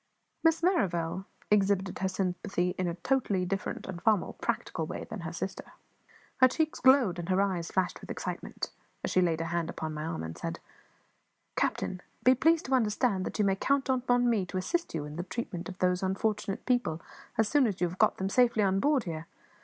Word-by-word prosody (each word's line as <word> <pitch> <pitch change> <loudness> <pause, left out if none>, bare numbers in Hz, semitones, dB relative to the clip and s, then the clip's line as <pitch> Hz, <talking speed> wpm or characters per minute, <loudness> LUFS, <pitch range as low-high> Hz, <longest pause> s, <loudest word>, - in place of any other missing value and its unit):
Miss 325 0 +3
Merrivale 190 - +1 0.3
exhibited 195 -2 +2
her 190 - +1
sympathy 185 -1 -1
in 185 - +1
a 170 - -2
totally 200 -2 0
different 195 +2 -3
and 180 -2 -6
far 220 -2 +5
more - - -6
practical - - -2
way - - -5
than - - -7
her - - -5
sister. - - -5 0.6
Her 255 - +7
cheeks 310 +4 -1
glowed, 255 -9 +5
and 170 +1 -5
her 185 0 +3
eyes 185 -4 0
flashed 185 -1 -1
with - - -11
excitement - - -4 0.3
as - - -1
she 185 - +4
laid 165 -2 +1
her - - -2
hand 170 0 -1
upon 155 -2 -4
my 150 0 -4
arm, 155 - -3
and 80 0 -6
said - - -5 1.0
"Captain, 185 - -1 0.2
be 255 - +7
pleased 325 +5 +3
to 265 - -1
understand 215 -4 +2
that - - -5
you 210 - +3
may 195 -1 +3
count 275 +6 +1
upon 245 -1 +2
me 225 -5 +2
to 185 - -4
assist 335 - -1
you 150 -2 -2
in 150 +1 -8
the 175 - -2
treatment 190 -4 -5
of 185 - -8
those 180 -1 +2
unfortunate 195 +1 -1
people, 245 -11 +1 0.4
as 220 -1 +3
soon 275 +1 +4
as 200 -4 -3
you 180 - +2
have 180 +2 -8
got - - +4
them 190 - -1
safely 235 -1 +4
on 195 0 +2
board 285 0 +3
here. 165 -1 -5
195 Hz, 210 wpm, -30 LUFS, 180-245 Hz, 1.0 s, Her